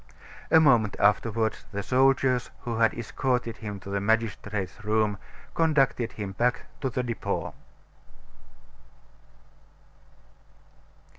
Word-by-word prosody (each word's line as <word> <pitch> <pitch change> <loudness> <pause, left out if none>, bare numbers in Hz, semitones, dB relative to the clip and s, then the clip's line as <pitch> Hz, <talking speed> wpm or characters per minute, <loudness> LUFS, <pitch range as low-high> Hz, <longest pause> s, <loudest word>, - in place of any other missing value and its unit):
A 160 - +7
moment 120 -9 +4
afterward 110 +2 +2
the 100 0 -3
soldiers 130 0 +2
who 115 -2 -3
had 115 -1 +3
escorted 120 0 -2
him 105 -2 -6
to 100 - -8
the 100 0 -1
magistrate's 105 -1 -1
room 105 -1 +1 0.3
conducted 135 -7 +1
him 100 -2 -5
back 120 +5 0 0.2
to 135 - 0
the 125 +1 -2
Depot. 120 -2 -3
115 Hz, 100 wpm, -27 LUFS, 105-125 Hz, 0.3 s, A